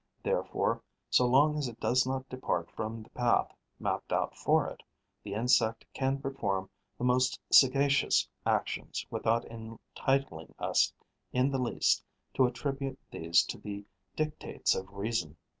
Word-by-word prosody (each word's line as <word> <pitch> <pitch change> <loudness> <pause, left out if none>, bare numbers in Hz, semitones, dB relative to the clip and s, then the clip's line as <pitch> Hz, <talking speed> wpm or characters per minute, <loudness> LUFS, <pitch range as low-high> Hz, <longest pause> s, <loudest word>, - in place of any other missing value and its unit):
Therefore, - - 0 0.3
so 125 - +5
long 145 +4 +4
as 140 - -1
it 115 -2 -9
does 125 +1 +2
not 130 0 -2
depart 90 -10 -2
from 110 0 -5
the - - -20
path 120 -1 +1 0.3
mapped - - -2
out - - 0
for - - +2
it, - - -8 0.4
the 100 -1 -6
insect 115 -1 +2
can 135 0 0
perform 100 -9 -2 0.3
the - - -5
most 125 +1 +2
sagacious 140 +1 +5 0.2
actions - - -1
without 115 +1 +1
entitling 115 - -3
us - - +2 0.4
in 130 +2 +2
the 135 - 0
least 125 -2 +2 0.3
to 130 - +4
attribute 135 +1 -3
these 85 +1 +3
to 120 - -6
the 100 -1 -7 0.3
dictates 155 0 0
of 95 0 -5
reason. 100 -6 -2
125 Hz, 140 wpm, -31 LUFS, 110-135 Hz, 0.4 s, so